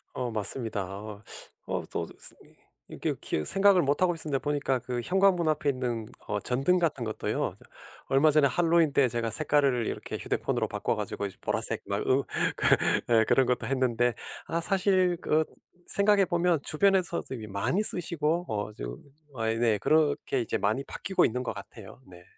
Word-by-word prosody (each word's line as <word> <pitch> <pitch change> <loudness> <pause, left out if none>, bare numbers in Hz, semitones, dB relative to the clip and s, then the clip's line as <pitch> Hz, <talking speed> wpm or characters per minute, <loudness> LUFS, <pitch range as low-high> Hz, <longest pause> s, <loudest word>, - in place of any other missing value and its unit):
어 125 -2 -3
맞습니다. 110 -1 0
어, 105 0 -9 0.5
어 - - -2
또 - - -2
스 - - -3 0.5
이게 - - -3
이렇게 75 - -2
생각을 195 - +4
못하고 170 +5 +1
있었는데 150 -4 -1
보니까 145 -3 -1
그 125 0 -4
현관문 185 -2 +2
앞에 150 -1 0
있는 125 -4 -2 0.2
어 105 0 -1
전등 135 - +1
같은 155 -7 -1
것도요. 110 -1 -2
저 - - -17 0.4
얼마 140 +3 +4
전에 150 -1 +4
할로윈 165 0 +2
때 135 -2 +3
제가 115 -1 -2
색깔을 140 -1 +2
이렇게 - - -5
휴대폰으로 - - -2
바꿔 - - -1
가지고십 100 -2 -5
보라색 - - +1
막 100 0 -1
으 135 +2 +3 0.3
그 - - -3 0.5
예 110 - +3
그런 135 - +4
것도 125 -2 -1
했는데 125 -2 +1 0.3
아 170 - -1
사실 185 -1 +2
그 155 +1 +2 0.4
생각해 200 0 +4
보면 175 -2 +1
주변에서도 185 0 +1
이미 110 -3 -8
많이 100 - 0
쓰시고 170 -3 +1
어 105 0 -3
지금 - - -6 0.4
아 115 -2 -2
네 115 -2 +2
그렇게 150 -2 +1
이제 115 - -2
많이 110 +7 0
바뀌고 190 +7 0
있는 125 +3 -2
것 125 - -3
같아요. - - -11
네. 90 -1 -14
135 Hz, 345 characters per minute, -28 LUFS, 115-170 Hz, 0.5 s, 생각을